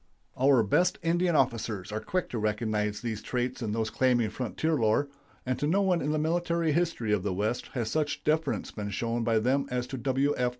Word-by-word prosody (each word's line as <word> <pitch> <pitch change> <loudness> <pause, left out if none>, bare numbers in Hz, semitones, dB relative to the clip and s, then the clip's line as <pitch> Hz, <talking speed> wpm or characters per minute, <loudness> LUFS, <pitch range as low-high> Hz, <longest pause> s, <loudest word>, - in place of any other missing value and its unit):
Our 130 -2 +4
best 180 - +2
Indian 175 +1 +2
officers 110 -7 0
are 110 - -2
quick 180 +11 -2
to 120 - -3
recognize 105 -1 -1
these 110 -3 -3
traits 125 +3 -2
in 110 -3 -2
those 110 0 -1
claiming 120 -4 +2
frontier 130 +8 -2
lore, 120 +1 +2 0.4
and 130 -1 -1
to 145 - 0
no 195 +6 +3
one 180 -3 +2
in 145 - -1
the 155 - +1
military 170 +1 +1
history 150 -9 0
of 105 - +1
the 95 -1 -2
West 110 +5 -1
has 115 -4 -2
such 150 -2 -1
deference 155 -1 0
been 105 -1 -5
shown 115 +3 -1
by 115 -1 +2
them 130 +5 +1
as 125 -1 -1
to 130 +1 -6
W. 135 +3 +1
F. 125 0 +1
125 Hz, 210 wpm, -28 LUFS, 110-150 Hz, 0.4 s, Our